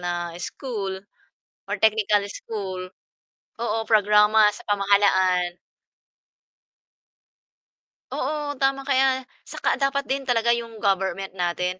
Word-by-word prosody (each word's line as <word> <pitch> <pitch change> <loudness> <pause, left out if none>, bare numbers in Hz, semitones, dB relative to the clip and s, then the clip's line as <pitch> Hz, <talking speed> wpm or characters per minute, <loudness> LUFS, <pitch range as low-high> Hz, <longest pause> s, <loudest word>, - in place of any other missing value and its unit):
na 175 -1 -3
school 195 -4 -5 0.7
or - - -1
technical 215 -1 +3
school. 190 -4 -5 0.8
Oo, 225 -1 -1
programa 210 0 +5
sa - - -12
pamahalaan. 190 -3 +2 2.5
Oo 290 0 -3
tama 270 0 +1
kaya 265 -1 +2 0.2
saka - - -1
dapat 275 0 +1
din 270 0 -3
talaga 235 -1 +2
'yong 230 -2 -3
government 195 -1 0
natin 180 0 -2
210 Hz, 95 wpm, -24 LUFS, 190-255 Hz, 2.5 s, programa